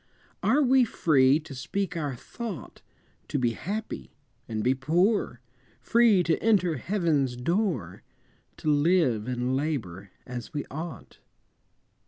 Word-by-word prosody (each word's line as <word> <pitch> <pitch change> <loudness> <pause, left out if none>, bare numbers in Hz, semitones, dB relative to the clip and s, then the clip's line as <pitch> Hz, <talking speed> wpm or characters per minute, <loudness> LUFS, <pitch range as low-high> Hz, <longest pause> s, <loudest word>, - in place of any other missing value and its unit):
Are 290 +2 +3
we 260 0 +5
free 145 - +3
to 150 -2 -10
speak 180 +8 -3
our 145 -5 -2
thought, 200 - -8 0.5
To 145 - -2
be 120 -3 +1
happy, 195 - -5 0.3
and 110 -1 -3
be 125 - +3
poor, 160 - +1 0.4
Free 230 -6 +4
to 165 -2 0
enter 185 -8 +2
Heaven's 155 - 0
door, 130 - -1 0.6
To 155 - -2
live 145 - +2
and 125 +1 -1
labor 110 - -3 0.2
as 125 +3 -7
we 145 - -2
ought? 160 +4 -7
150 Hz, 125 wpm, -27 LUFS, 125-185 Hz, 0.6 s, we